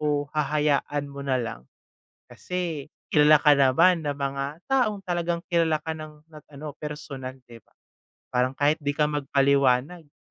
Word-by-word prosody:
o 145 -1 0
hahayaan 150 -1 0
mo 140 - -8
nalang. 125 - -3 0.6
Kasi, 170 -6 -4 0.2
kilala 150 +1 +7
ka 150 0 +5
naman 145 +6 +4
ng 145 - -2
mga 140 -1 -2 0.2
taong, 230 -7 0
talagang 175 -1 -2
kilala 165 -2 +3
ka 160 - -2
ng 155 -1 -10
ng 155 -2 -15
ano, 150 +1 -7
personal, 140 -3 -7
'di 115 -1 -14
ba? - - -36 0.5
Parang, 125 +1 0
kahit 145 +2 +2
'di 145 - +1
ka 150 +1 +1
magpaliwanag, 140 +2 +1
"Hmm, 145 - -33
150 Hz, 150 wpm, -25 LUFS, 140-160 Hz, 0.6 s, kilala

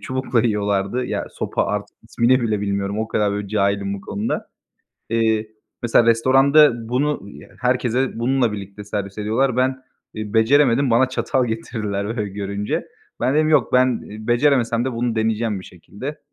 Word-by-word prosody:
çubukla 130 +2 -1
yiyorlardı, 105 +1 0
ya, - - -3
sopa - - -2
artık - - -4
ismini 125 +2 +2
bile 110 -3 0
bilmiyorum 100 0 -2
o 110 0 -2
kadar 105 -1 +1
böyle 105 0 -3
bir - - -10
cahilim 100 -1 0
bu 100 - -7
konuda. 100 +2 -3 0.6
Eee, 110 -1 +1 0.3
mesela 120 0 +3
restoranda 130 +1 +4
bunu, 140 +5 0
ııı, 100 - -13
herkese 125 0 0
bununla 125 -1 +1
birlikte 100 0 -8
servis 100 0 -5
ediyorlar. 115 +5 0
Ben, 130 +1 0 0.3
iii, 110 0 -6
beceremedim, 130 +2 +4
bana 130 +3 +4
çatal 130 0 0
getirdiler 110 -3 -3
böyle 105 -2 -2
görünce. 100 +1 -3 0.3
Ben 130 - +1
dedim, 155 0 +3
"Yok, 155 - +3
ben 125 -1 +3 0.3
beceremesem 120 -2 +2
de 130 - -2
bunu 115 -1 -2
deneyeceğim 110 -2 0
bir - - -12
şekilde." 105 - -8
115 Hz, 160 wpm, -21 LUFS, 105-130 Hz, 0.6 s, restoranda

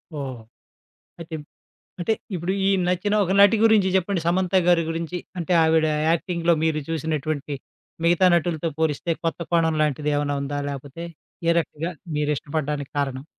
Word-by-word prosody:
ఓహ్! 130 -5 -5 0.8
అయితే 165 -1 -6 0.7
అంటే 175 +6 +1 0.2
ఇప్పుడు 175 +2 -1
ఈ - - +4 0.2
నచ్చిన 185 +4 0
ఒక 180 - -1
నటి 205 +2 +7
గురించి 215 -4 +5
జెప్పండి 185 -1 0
'సమంత' 185 +2 +1
గారి 175 -1 +5
గురించి? 165 +2 -3 0.2
అంటే, 170 +1 -1
ఆవిడ 160 0 +3 0.2
యాక్టింగ్‌లో 170 0 +1
మీరు 160 -1 +1
చూసినటువంటి 155 -2 -2 0.5
మిగతా 175 +2 +4
నటులతో 170 -1 0
పోలిస్తే, 160 +2 0
కొత్త 165 - -1
కోణం 165 -2 +2
లాంటిదేవన్నా 145 -1 0
ఉందా? 145 +1 -3
లేపోతే, 140 +4 -7 0.4
ఏ - - +6
రకంగా 165 +1 -3 0.3
మీరు 150 0 0
ఇష్టపడ్డానికి 145 -1 -3
కారణం? 135 -1 -2
160 Hz, 140 wpm, -23 LUFS, 150-175 Hz, 0.8 s, నటి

